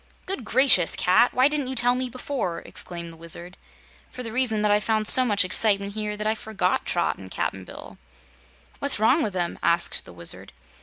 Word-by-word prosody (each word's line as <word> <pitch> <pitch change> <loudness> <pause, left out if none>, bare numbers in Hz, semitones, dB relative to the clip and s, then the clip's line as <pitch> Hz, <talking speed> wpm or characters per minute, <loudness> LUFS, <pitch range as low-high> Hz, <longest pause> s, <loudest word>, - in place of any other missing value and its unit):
"Good 375 -9 -4
gracious, 225 -7 +3
Cat! 185 +7 +3
Why 255 +2 +3
didn't 295 -2 -2
you 260 - -4
tell 245 0 +4
me 255 0 -3
before?" 250 -8 -4
exclaimed 170 -1 -4
the - - -15
Wizard. 170 +2 0 0.5
"For 250 - -8
the 225 - -6
reason 220 -3 +1
that 210 - +2
I 205 - +4
found 215 0 -1
so 255 - +7
much 205 -5 +2
excitement 200 +1 0
here 210 -1 -4
that 210 - -5
I 215 - +2
forgot 220 -1 -2
Trot - - -1
and - - -11
Cap'n - - -4
Bill." - - -12 0.8
"What's 280 - +2
wrong 240 +9 +3
with 210 -7 -2
them?" 175 -2 -2
asked 170 0 +1
the - - -12
Wizard. 85 -1 -7
215 Hz, 200 wpm, -24 LUFS, 185-250 Hz, 0.8 s, so